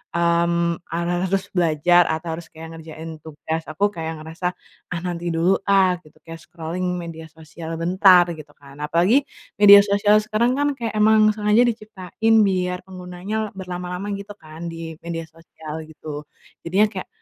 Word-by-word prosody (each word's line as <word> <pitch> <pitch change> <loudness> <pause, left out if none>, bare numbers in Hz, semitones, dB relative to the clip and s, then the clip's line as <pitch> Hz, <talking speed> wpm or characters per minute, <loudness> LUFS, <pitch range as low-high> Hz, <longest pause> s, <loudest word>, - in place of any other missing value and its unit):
mmm, 170 0 +1
ha 170 - -1 0.3
harus 190 +1 -1
belajar 175 +1 +4
atau 160 +1 -3
harus 170 - -10
kayak 160 +1 -10
ngerjain 160 0 -9
tugas, 160 +1 -5
aku 200 +6 +1
kayak 160 -4 -6
ngerasa, 165 +3 -3 0.4
"Ah 170 - -2
nanti 175 -1 -3
dulu 170 +4 +3
ah, 190 -2 +4
gitu" 155 0 -21
kayak 165 0 -7
scrolling 170 +1 -6 0.2
media 165 -1 -7
sosial 160 +1 -9
bentar, 180 +1 +5
gitu 150 -1 -12
kan. 140 0 -16
Apalagi, 180 - +3 0.3
media 205 0 +10
sosial 205 +1 +3
sekarang 220 +4 +1
kan 290 - +2
kayak 230 -2 -3
emang 215 0 +5
sengaja 210 +2 +3
diciptain 220 -1 -1
biar 180 -1 -1
penggunanya 190 +4 -5
berlama-lama 180 +1 -5
gitu 200 +1 -7
kan, 160 +2 -9
di 165 0 -7
media 165 -1 -5
sosial 160 0 -10
gitu. 150 -1 -7 0.5
Jadinya 195 +5 +4
kayak, - - -8
175 Hz, 155 wpm, -22 LUFS, 165-200 Hz, 0.5 s, media